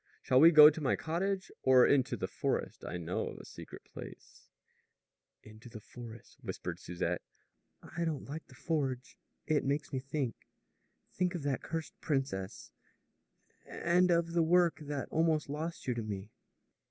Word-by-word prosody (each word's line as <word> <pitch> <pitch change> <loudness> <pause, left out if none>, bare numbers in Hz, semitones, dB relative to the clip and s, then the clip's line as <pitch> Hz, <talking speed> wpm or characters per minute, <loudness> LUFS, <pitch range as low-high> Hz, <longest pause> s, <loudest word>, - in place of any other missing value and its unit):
Shall 130 - +4
we 160 +4 +9
go 150 -2 +10
to 155 - -7
my 135 - +2
cottage 190 +4 -2
or 130 -1 +6
into 135 -3 +2
the - - -2
forest? - - -2
I - - -4
know 85 +1 -2
of - - -7
a - - -11
secret - - -11
place - - -12 0.5
" - - -58
"Into 110 +3 -13
the 110 - -9
forest," 115 +1 -12
whispered 90 0 -5
Susette. 90 -1 -3 0.6
"I 170 - -4
don't 160 -4 -2
like 155 +3 -7
the 130 - -16
forge. 135 -4 -2 0.3
It 155 -2 +1
makes 140 +1 -1
me 130 - 0
think 135 -2 -2 0.8
think 180 -1 0
of 165 - -4
that 140 -2 -1
cursed 165 -1 -5
princess 135 -10 -2 1.0
and 180 +1 +2
of 170 -1 +2
the 170 - +3
work 170 -2 +3
that 145 -2 -4
almost 160 -2 +1
lost 160 +4 -4
you 125 - 0
to 120 - -3
me." 105 -1 -6
145 Hz, 165 wpm, -32 LUFS, 125-165 Hz, 1.0 s, go